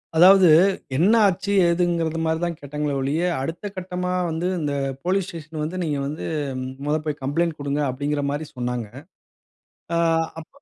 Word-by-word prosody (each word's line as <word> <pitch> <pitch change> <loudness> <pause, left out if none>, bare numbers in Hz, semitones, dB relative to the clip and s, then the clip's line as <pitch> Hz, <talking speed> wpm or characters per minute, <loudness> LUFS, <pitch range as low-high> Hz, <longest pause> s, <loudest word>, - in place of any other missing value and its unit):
அதாவது 185 +2 +7 0.5
என்ன 185 +9 +4
ஆச்சு? 195 +1 -1 0.2
ஏதுங்கிறதுமாரி 165 -2 +1
தான் 170 -1 -1
கேட்டாங்களே 150 +1 -3
ஒழிய, 140 +5 0 0.2
அடுத்த 165 +8 -4
கட்டமா 180 0 -3 0.2
வந்து 165 +2 -2
இந்த 145 -2 -1 0.3
போலீஸ் 190 +1 +1
ஸ்டேஷ்ன் 160 -3 -8
வந்து 165 +4 -4
நீங்க 150 -3 -1
வந்து 150 +3 -5 0.6
மொத 150 +1 +1
போய் 150 -2 -2
கம்ப்ளைண்ட் 165 +4 0
குடுங்க 145 0 -2
அப்பிடிங்கிற 145 +3 -2
மாரி 145 +2 -3
சொன்னாங்க. 125 -1 -2 1.1
அ - - +2 0.4
அப்ப 160 - -11
160 Hz, 140 wpm, -23 LUFS, 145-175 Hz, 1.1 s, அதாவது